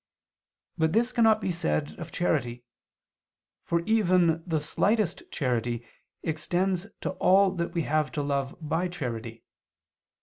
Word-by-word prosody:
But 160 0 +2
this 235 +3 +2
cannot 225 -3 +4
be 190 - -1
said 165 -3 -1
of 170 -1 -7
charity, 125 -9 -1 1.0
for 170 0 0
even 180 -5 +3
the 160 -2 +1
slightest 200 +5 +1
charity 120 -3 -1 0.4
extends 175 +4 -1
to - - -2
all 190 +1 +5
that 170 -2 -3
we 170 - +1
have 155 0 0
to 145 - -1
love 140 -1 -2
by 165 +3 -1
charity. 115 -9 -5
165 Hz, 130 wpm, -27 LUFS, 145-185 Hz, 1.0 s, all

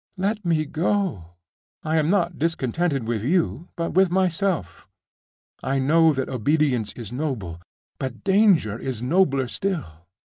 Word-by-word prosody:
Let 205 +3 -1
me 165 -3 +1
go! 155 - -1 0.5
I 160 +1 0
am 155 0 +2
not 175 -3 +1
discontented 150 -3 -1
with 115 -3 -1
you, 170 +3 0
but 170 -1 -2
with 190 0 +4
myself. 180 - -1 0.7
I 135 +1 -1
know 160 +4 +4
that 135 -3 -2
obedience 130 -2 +1
is 115 -3 -8
noble; 120 - -4 0.4
but 130 -3 -5
danger 190 - +3
is 125 -3 -4
nobler 140 -3 +2
still. 120 - -4
155 Hz, 135 wpm, -23 LUFS, 125-180 Hz, 0.7 s, with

